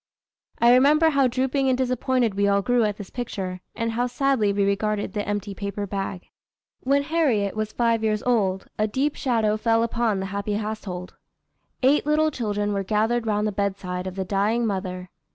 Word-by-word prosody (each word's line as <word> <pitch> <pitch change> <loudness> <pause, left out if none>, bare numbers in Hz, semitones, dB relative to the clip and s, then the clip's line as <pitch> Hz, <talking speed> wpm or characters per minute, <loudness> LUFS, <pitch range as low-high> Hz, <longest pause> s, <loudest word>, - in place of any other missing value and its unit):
I 235 +1 +5
remember 300 +5 +5
how 275 -3 +3
drooping 265 +2 0
and 255 - +2
disappointed 255 -2 +1
we 200 +1 +1
all 200 0 +2
grew 245 +1 +2
at 210 -1 -2
this 205 - -9
picture, 190 -7 -5
and 230 0 -1
how 240 +2 0
sadly 250 -4 +1
we 200 0 +1
regarded 205 0 -1
the 205 -1 -3
empty 205 -1 -3
paper 200 +1 -4
bag." 195 -2 -5 0.5
When 280 +2 +1
Harriet 280 -11 +1
was 215 0 -2
five 230 -1 +1
years 215 -1 0
old, 195 -6 +1
a 215 - +2
deep 275 +7 -1
shadow 225 -5 +1
fell 225 +1 +2
upon 230 -3 0
the 190 - -3
happy 200 +1 -2
household. 205 -4 -5 0.7
Eight 285 +3 +3
little 310 +1 +3
children 210 -5 -2
were 195 -1 -1
gathered 225 +4 0
round 210 0 +1
the 215 - 0
bedside 190 -2 -3
of 185 - -6
the 190 -1 -3
dying 210 +5 +1
mother. 185 -3 -4
215 Hz, 185 wpm, -24 LUFS, 200-245 Hz, 0.7 s, I